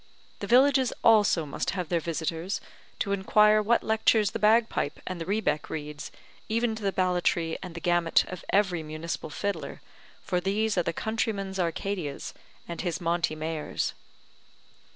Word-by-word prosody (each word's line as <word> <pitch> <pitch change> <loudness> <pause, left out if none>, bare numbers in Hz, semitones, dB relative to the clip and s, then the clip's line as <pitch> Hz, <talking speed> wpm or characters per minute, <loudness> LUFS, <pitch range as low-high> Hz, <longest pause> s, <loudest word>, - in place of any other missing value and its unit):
The 200 - -5
villages 260 +2 +5
also 210 -7 +5
must 140 - -3
have 180 -3 -3
their 170 - +2
visitors 165 +3 -3 0.4
to 200 - -2
inquire 210 +2 +4
what 230 +3 +2
lectures 220 -1 +3
the - - -4
bagpipe 220 -7 +2
and 185 -2 -5
the 165 - -5
rebeck 195 -7 0
reads, 150 -1 -6 0.4
even 230 +1 +1
to 220 - -7
the 200 -1 0
ballatry 175 -3 +1
and 180 -3 -8
the - - -4
gamut 175 -1 +2
of 185 - -7
every 190 -4 +2
municipal 155 +1 -5
fiddler, 170 -1 -4 0.4
for 180 - -1
these 210 +3 0
are 180 - +3
the 170 - -1
countryman's 200 -1 -2
Arcadias, 170 -3 -3 0.3
and 170 - -5
his 175 -4 -2
Monte 170 -2 0
Mayors. 155 0 -3
185 Hz, 150 wpm, -27 LUFS, 165-210 Hz, 0.4 s, villages